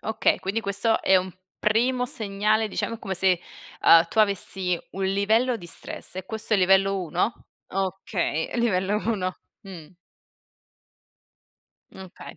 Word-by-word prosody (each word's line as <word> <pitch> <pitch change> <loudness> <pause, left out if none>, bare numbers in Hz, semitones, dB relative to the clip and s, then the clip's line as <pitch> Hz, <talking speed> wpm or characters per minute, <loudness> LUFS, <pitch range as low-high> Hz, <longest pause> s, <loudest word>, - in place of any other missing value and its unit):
Okay, 220 0 +1
quindi 200 +4 -2
questo 205 +2 +2
è 190 - +5
un 185 0 -1 0.3
primo 245 +4 +1
segnale 215 -2 0
diciamo 230 +3 -3
come 195 -4 -4
se, 185 -1 +2 0.4
ehm, 165 0 +7
tu 220 - -5
avessi 195 -3 +1 0.2
un 195 - -3
livello 215 +6 +1
di 175 -6 -11
stress 170 - -4
e 185 - -5
questo 220 +2 -2
è - - +4
il 190 - +2
livello 195 +1 +3
1? 180 +7 -2 0.2
Okay, 190 - -2
livello 205 -3 +1
1. 185 -5 -1 0.2
Mh. 180 -6 -11 2.0
Okay. 190 -1 -11
195 Hz, 135 wpm, -24 LUFS, 185-220 Hz, 2.0 s, ehm